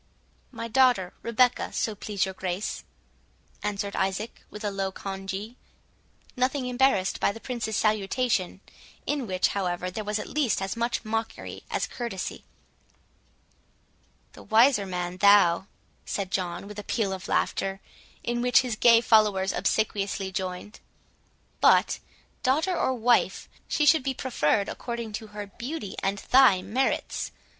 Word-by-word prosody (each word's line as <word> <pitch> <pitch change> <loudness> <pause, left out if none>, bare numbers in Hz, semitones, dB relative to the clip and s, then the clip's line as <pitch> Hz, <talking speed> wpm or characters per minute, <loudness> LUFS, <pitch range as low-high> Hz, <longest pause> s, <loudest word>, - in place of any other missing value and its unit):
"My 230 -2 -5
daughter 240 -6 +3
Rebecca, 245 +2 +2
so 220 - -1
please 205 -1 -2
your 190 - -5
Grace," 185 +2 -3 0.8
answered 200 -1 -3
Isaac, 195 +4 -2
with 210 - -9
a 205 - -1
low 195 -1 -2
congee, 195 +4 -6 0.8
nothing 255 +1 0
embarrassed 250 -6 +2
by - - +2
the 225 - -9
Prince's 230 -3 -3
salutation, 210 -2 0 0.4
in 285 -5 -1
which, 185 -1 +1
however, 180 -2 -2
there 215 +3 -4
was 210 +1 -1
at 210 - -4
least 285 -7 0
as 195 +2 -3
much 235 0 -1
mockery 225 +1 -4
as - - -1
courtesy. 235 -7 -5 1.9
"The - - -13
wiser 225 -2 +4
man 180 -1 -3
thou," 195 -2 +5 0.4
said 195 -2 -3
John, 180 0 -2
with 210 0 -8
a - - -6
peal 205 -2 -1
of 190 0 -7
laughter, 195 0 0 0.4
in 240 0 -1
which 250 0 +5
his 250 -4 -3
gay 230 +1 +6
followers 210 -4 +3
obsequiously 200 0 -1
joined. 185 +2 -5 0.8
"But, - - +4 0.4
daughter 310 +8 +1
or 260 -5 +1
wife, 240 0 +2 0.2
she 300 - +1
should 315 +1 +6
be 265 0 -2
preferred 205 -6 +1
according 235 -3 -5
to 220 - -10
her 210 0 -7
beauty 235 +2 -6
and 195 +1 0
thy 250 -8 +6
merits. 250 +8 -1
210 Hz, 140 wpm, -27 LUFS, 195-240 Hz, 1.9 s, gay